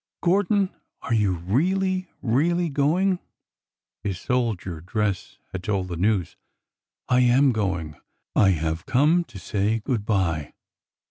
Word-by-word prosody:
" - - -67
Gordon, 195 +2 +2 0.3
are 115 - -1
you 105 -4 +2
really, 185 - 0 0.2
really 165 +8 +2
going? 175 +7 +2 0.4
" - - -67
His 95 -3 -3
soldier 110 -10 -1
dress 100 +1 -2
had 95 - -5
told 95 -2 -1
the 85 - -3
news. 95 0 0 0.4
" - - -67 0.3
I 125 - +3
am 125 +2 +5
going. 90 - -2 0.4
I 100 - +5
have 80 -2 -1
come 155 +7 +3
to 100 - -12
say 105 +3 0
good 115 0 -2
by." 90 -8 0
110 Hz, 140 wpm, -24 LUFS, 95-150 Hz, 0.4 s, am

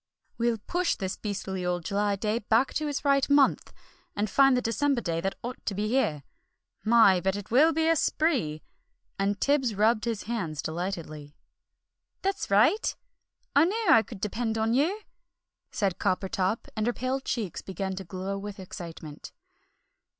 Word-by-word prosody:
"We'll 235 -1 +1
push 350 - -1
this 190 -1 -3
beastly 195 -3 -4
old 175 -2 -2
July 205 0 0
day 215 +3 -1
back 230 +4 +2
to 305 - -1
its 290 0 -3
right 275 -1 +3
month, 285 -1 +3 0.4
and 205 0 -1
find 270 0 +5
the - - +1
December 275 +3 +1
day 165 -6 -2
that 195 +2 -2
ought 245 +1 -6
to 200 - -1
be 210 +2 -1
here. 160 - +1 0.6
My, 220 -5 +6
but 190 +1 0
it 205 0 -7
will 295 +7 +6
be 320 0 +1
a 330 - +4
spree!" 260 - 0 0.6
and 200 0 0
Tibbs 270 -6 +1
rubbed 215 +2 +2
his 230 -3 -2
hands 175 -11 -3
delightedly. 160 -4 -5 0.9
"That's 390 0 -1
right! 210 - +3 0.6
I 285 +3 +6
knew 435 +5 -1
I 225 - +8
could 220 -3 -10
depend 225 +2 -2
on 220 +1 +1
you!" 335 - +1 0.7
said 195 -4 -1
Coppertop, 190 +2 -1
and 215 0 -1
her 240 - +1
pale 255 +2 -2
cheeks 225 -8 -3
began 190 0 -4
to 190 - -5
glow 190 +2 -4
with 205 0 -7
excitement. 165 -5 -9
215 Hz, 165 wpm, -27 LUFS, 190-260 Hz, 0.9 s, I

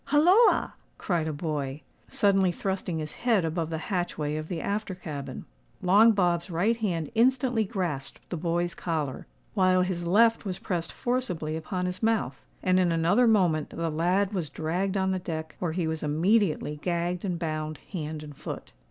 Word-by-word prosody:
"Holloa!" 355 - +5 0.2
cried 170 -4 -1
a - - -1
boy, 145 -2 -3 0.3
suddenly 195 -3 +3
thrusting 185 -2 -2
his 155 -1 -5
head 225 -8 +3
above 160 0 -2
the 160 - -2 0.2
hatchway 155 -4 -1
of 155 0 -4
the 170 -1 -3
after 200 +1 -2
cabin. 150 -6 -6 0.4
Long 205 +5 +6
Bob's 175 -3 +1
right 185 +7 +2
hand 175 -9 -2
instantly 245 -1 +3
grasped 175 - -3
the - - -1
boy's 170 +1 -1
collar, 155 -6 -3 0.3
while 185 -1 +4
his 175 -2 -2
left 225 +5 +4
was 190 -4 -3
pressed 170 -3 -3
forcibly 210 -11 -2
upon 180 +3 -3
his 180 0 -3
mouth; 220 - 0 0.2
and 185 0 +3
in 180 -2 +3
another 175 +9 +3
moment 175 -9 +3
the 165 -1 -3
lad 185 +6 +1
was 175 -6 -2
dragged 185 +5 -1
on 190 0 +1
the 190 - 0
deck, 160 -3 -5
where 170 -3 -1
he 175 -1 -1
was 160 0 -2
immediately 155 -1 +1
gagged 175 0 -1
and 180 -4 -1
bound 155 -2 -3
hand 155 -4 -4
and 150 -1 -10
foot. - - -7
175 Hz, 170 wpm, -27 LUFS, 160-195 Hz, 0.4 s, Long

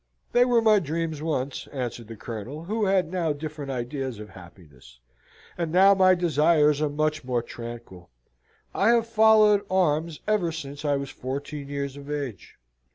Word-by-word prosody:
"They 245 0 +4
were 240 -2 +3
my 215 -2 +5
dreams 160 -2 -3
once," 140 -4 -3
answered 120 -4 -5
the 115 - -8
Colonel, 115 +7 -7
who 215 +4 -1
had 190 -4 +1
now 170 -4 0
different 150 -1 -7
ideas 130 -1 -4
of 105 0 -9
happiness, 80 -9 -16 0.6
"and 165 -2 -2
now 190 +3 +6
my 185 -1 +5
desires 155 -3 +3
are 150 - +1
much 155 +1 -1
more 125 -2 -1
tranquil. 115 -8 -10 0.6
I 200 - +1
have 230 -1 +1
followed 220 -2 +5
arms 165 -4 +1
ever 205 -6 +1
since 145 -2 -7
I 145 -1 +1
was 140 -1 -4
fourteen 140 +2 -6
years 140 -1 -4
of 140 0 -11
age. 140 - -5
150 Hz, 160 wpm, -25 LUFS, 130-180 Hz, 0.6 s, now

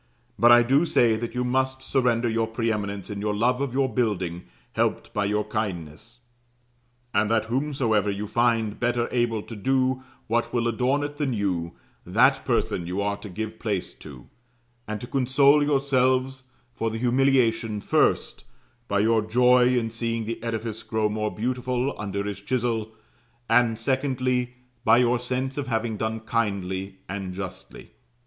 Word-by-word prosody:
But 120 0 +7
I 120 0 +8
do 135 +6 +3
say 120 -9 +3
that 115 +2 -5
you 125 - 0
must 130 +1 0
surrender 120 -3 +1
your 115 0 0
pre 115 0 -1
eminence 100 -2 -4
in 100 -1 -5
your 105 0 -1
love 125 +4 +1
of 140 -3 -1
your 135 +1 +1
building 95 -9 -2 0.3
helped - - -1
by 105 -1 0
your 105 +1 0
kindness; 105 +1 -5 0.9
and 105 +1 +2
that 110 -1 +2
whomsoever 120 -5 0
you 100 +1 -3
find 115 -1 +1
better 120 -1 +1
able 120 -3 0
to 115 - -9
do 130 +4 +1 0.2
what 120 +2 0
will 120 -1 0
adorn 125 +5 +1
it 145 0 -5
than 145 -4 -1
you, 90 -5 -2 0.3
that - - +3
person 85 - 0
you 90 +3 -3
are 100 0 -1
to 105 - -9
give 110 +3 -5
place 100 -5 -2
to; 65 -5 -11 0.6
and 105 0 -4
to - - -5
console 140 +3 +4
yourselves 130 -2 +1 0.3
for 115 -1 -2
the 110 - -4
humiliation, 120 -3 +2
first, - - +1 0.4
by 100 0 +1
your 110 +1 +3
joy 125 +3 +4
in 115 -2 -1
seeing 115 -1 -2
the 115 +1 -5
edifice 115 -1 -4
grow 110 -1 -1
more 105 0 -1
beautiful 125 +3 -1
under 100 -1 -3
his 100 -1 -5
chisel, 115 -1 -1 0.6
and 115 -1 +3
secondly, 130 0 -1 0.3
by 110 -1 +5
your 125 0 +3
sense 130 +3 -3
of 140 - -4
having 115 -2 -1
done 110 +1 -3
kindly 100 -4 -2
and 95 -2 -5
justly. 95 -1 -8
115 Hz, 160 wpm, -25 LUFS, 105-125 Hz, 0.9 s, I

